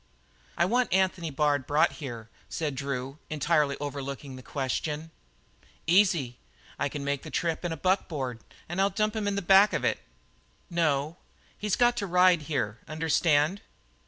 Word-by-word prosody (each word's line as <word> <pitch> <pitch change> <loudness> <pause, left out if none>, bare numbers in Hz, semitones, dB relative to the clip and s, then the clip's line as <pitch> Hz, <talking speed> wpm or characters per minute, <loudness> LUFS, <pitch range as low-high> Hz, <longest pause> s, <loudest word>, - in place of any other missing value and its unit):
"I 170 - +4
want 245 +5 +1
Anthony 185 -3 +1
Bard 145 -1 +1
brought 150 +2 +3
here," 120 -5 -6 0.2
said. 155 -3 -2
Drew, 135 +1 -4
entirely 150 -2 +1
overlooking 140 -1 -5
the 130 - -9
question. 150 +4 -3 0.7
"Easy. 165 - +3 0.4
I - - 0
can 145 - -5
make 140 -1 -1
the - - -9
trip 165 -1 -1
in 175 - -2
a 165 - -3
buckboard 145 - -1 0.3
and 175 +3 -1
I'll 195 - +4
dump 215 +3 0
him 215 -2 -1
in 200 - 0
the 200 - -2
back 195 +3 +6
of - - 0
it." - - +1 0.7
"No. 155 -1 0 0.4
He's 210 -2 -1
got 240 0 +4
to 200 - -2
ride 180 -1 +5
here, 115 -7 -1
understand?" 155 +3 +2
155 Hz, 160 wpm, -28 LUFS, 140-185 Hz, 0.7 s, back